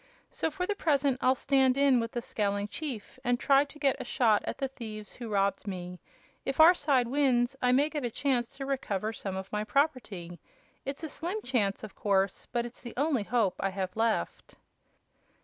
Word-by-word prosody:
So 320 Hz, -, -1 dB
for 360 Hz, +4 st, -3 dB
the 415 Hz, -, 0 dB
present 285 Hz, -8 st, +1 dB
I'll 260 Hz, +1 st, +4 dB
stand 265 Hz, -1 st, +3 dB
in 275 Hz, -3 st, +5 dB
with 230 Hz, 0 st, -3 dB
the 240 Hz, -, -3 dB
scowling 205 Hz, -1 st, -1 dB
chief 265 Hz, -8 st, -6 dB
and 245 Hz, 0 st, +1 dB
try 275 Hz, +1 st, +4 dB
to 290 Hz, +1 st, -14 dB
get 275 Hz, -3 st, +1 dB
a -, -, -3 dB
shot 225 Hz, -4 st, +2 dB
at -, -, -3 dB
the 270 Hz, -, -1 dB
thieves 220 Hz, -5 st, -8 dB
who 235 Hz, -2 st, -7 dB
robbed 200 Hz, 0 st, 0 dB
me. 180 Hz, -2 st, -5 dB, 0.4 s
If 270 Hz, +2 st, -3 dB
our 325 Hz, +3 st, +9 dB
side 280 Hz, -7 st, +2 dB
wins 255 Hz, -2 st, +2 dB
I 250 Hz, -, +3 dB
may 275 Hz, +4 st, +4 dB
get 300 Hz, -3 st, -4 dB
a 240 Hz, -, 0 dB
chance 245 Hz, -1 st, -1 dB
to 270 Hz, -, -4 dB
recover 220 Hz, -6 st, -2 dB
some 195 Hz, -3 st, -5 dB
of 190 Hz, 0 st, -6 dB
my 210 Hz, 0 st, -1 dB
property. 215 Hz, -, -1 dB, 0.5 s
It's 275 Hz, +3 st, -5 dB
a -, -, -2 dB
slim 345 Hz, +7 st, -3 dB
chance, 215 Hz, -6 st, 0 dB
of 215 Hz, -, -8 dB
course, 195 Hz, -1 st, 0 dB
but 240 Hz, -1 st, 0 dB
it's 240 Hz, -, -10 dB
the 240 Hz, -, -9 dB
only 280 Hz, -3 st, +2 dB
hope 215 Hz, -3 st, +1 dB
I 195 Hz, -, 0 dB
have 190 Hz, -1 st, -4 dB
left." 225 Hz, -, -1 dB
245 Hz, 200 wpm, -29 LUFS, 210-275 Hz, 0.5 s, our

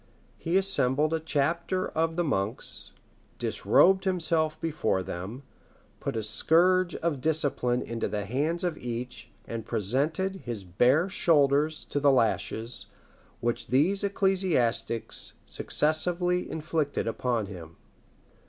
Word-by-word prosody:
He 170 Hz, +3 st, +1 dB
assembled 155 Hz, -6 st, +2 dB
a 160 Hz, -, +1 dB
chapter 165 Hz, +4 st, -1 dB
of 160 Hz, 0 st, -1 dB
the 175 Hz, -, +1 dB
monks, 105 Hz, -8 st, -2 dB, 0.4 s
disrobed 190 Hz, +1 st, +3 dB
himself 160 Hz, -4 st, 0 dB
before 150 Hz, -, -1 dB
them, 100 Hz, +11 st, -6 dB, 0.6 s
put -, -, -3 dB
a 110 Hz, -, -2 dB
scourge 175 Hz, -, +3 dB
of 160 Hz, -6 st, -2 dB
discipline 140 Hz, -5 st, +1 dB
into 115 Hz, -1 st, -3 dB
the 105 Hz, -1 st, -3 dB
hands 150 Hz, -, -1 dB
of 175 Hz, -3 st, -2 dB
each, 125 Hz, +1 st, -5 dB, 0.2 s
and 115 Hz, -1 st, -5 dB
presented 150 Hz, -, -1 dB
his 120 Hz, -, -6 dB
bare 125 Hz, -, +3 dB
shoulders 155 Hz, -4 st, +2 dB
to 145 Hz, -, -2 dB
the 140 Hz, 0 st, +5 dB
lashes 115 Hz, -1 st, 0 dB, 0.5 s
which 120 Hz, 0 st, -1 dB
these 175 Hz, +10 st, +3 dB
ecclesiastics 185 Hz, -, 0 dB
successively 175 Hz, +4 st, +1 dB
inflicted 155 Hz, -2 st, -2 dB
upon 115 Hz, -1 st, -1 dB
him. 85 Hz, -5 st, -10 dB
150 Hz, 115 wpm, -28 LUFS, 120-170 Hz, 0.6 s, the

